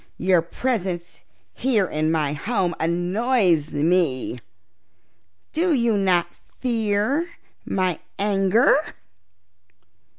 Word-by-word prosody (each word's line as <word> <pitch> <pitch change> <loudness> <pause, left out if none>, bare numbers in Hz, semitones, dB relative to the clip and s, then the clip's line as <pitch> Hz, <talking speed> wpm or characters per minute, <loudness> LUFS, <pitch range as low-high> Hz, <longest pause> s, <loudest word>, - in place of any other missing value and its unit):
Your 185 -2 +3
presence 180 -2 -3 0.3
here 235 -7 +1
in 155 -2 -1
my 150 -3 0
home 185 +2 -1
annoys 175 - +1
me. 150 -5 0 1.1
Do 335 +1 +2
you 235 -3 +2
not 185 -3 +1 0.3
fear 235 +6 0 0.4
my 185 -3 -1 0.2
anger?" 205 +8 +2
190 Hz, 80 wpm, -23 LUFS, 170-230 Hz, 1.1 s, Your